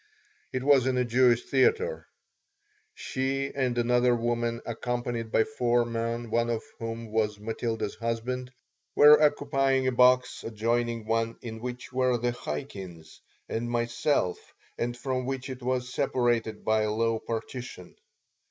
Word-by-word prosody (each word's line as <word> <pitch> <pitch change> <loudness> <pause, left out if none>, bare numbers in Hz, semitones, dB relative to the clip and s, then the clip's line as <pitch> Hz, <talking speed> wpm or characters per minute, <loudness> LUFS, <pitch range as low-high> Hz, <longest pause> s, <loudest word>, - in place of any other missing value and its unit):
It 130 - -2
was 135 -2 +5
in 130 -1 +1
a 125 - +2
Jewish 120 0 +3
theater. 450 - +1 0.9
She 135 +1 -2
and 130 -3 -1
another 120 +1 +3
woman, 120 0 -1
accompanied 120 -1 -3
by 110 - +4
four 120 -3 +1
men, 115 0 -3
one 115 +1 +1
of 115 -1 -1 0.2
whom 115 -1 -5
was 105 -2 0
Matilda's 110 -1 -3
husband, 115 +3 -3 0.4
were 150 +1 +8
occupying 135 -3 +2
a 130 - +2
box 125 0 +3
adjoining 115 +1 -1
one 115 +1 0
in 110 -2 -6
which 125 +1 -7
were 130 -1 +2
the 120 +1 0
Chaikins 85 -4 -7 0.3
and 120 +1 -3
myself 120 -4 0 0.4
and 120 0 -3
from 130 0 -2
which 135 0 -3
it 130 0 -8
was 125 0 -2
separated 120 -3 0
by 110 0 +3
a 105 0 0
low 115 +1 +1
partition. 115 -4 -6
120 Hz, 140 wpm, -28 LUFS, 115-130 Hz, 0.9 s, were